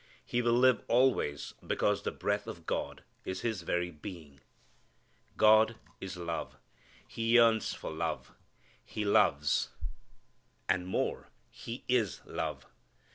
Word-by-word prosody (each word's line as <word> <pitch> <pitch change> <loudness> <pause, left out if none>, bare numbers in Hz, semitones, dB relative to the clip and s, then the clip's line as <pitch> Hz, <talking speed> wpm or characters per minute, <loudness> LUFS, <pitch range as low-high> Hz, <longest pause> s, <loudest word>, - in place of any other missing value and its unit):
He 120 - 0
will 120 -1 +2
live 130 -1 +5
always 115 - +2
because - - +1
the - - -2
breath 100 0 -2
of 85 -1 -8
God - - -3 0.2
is 95 0 -4
his 110 -6 -2
very 85 +1 -1
being. 80 -4 -10 1.0
God 110 +1 +6 0.2
is 95 -1 -6
love. 85 -1 -4 0.5
He 115 +1 0
yearns 115 -2 +5
for - - -6
love. - - -3 0.5
He 105 - -4
loves. 75 -7 +3 1.0
And 90 -1 +1
more, 95 - -2 0.2
He 115 +2 -8
is 120 -7 +1
love. - - -4
100 Hz, 125 wpm, -31 LUFS, 85-115 Hz, 1.0 s, God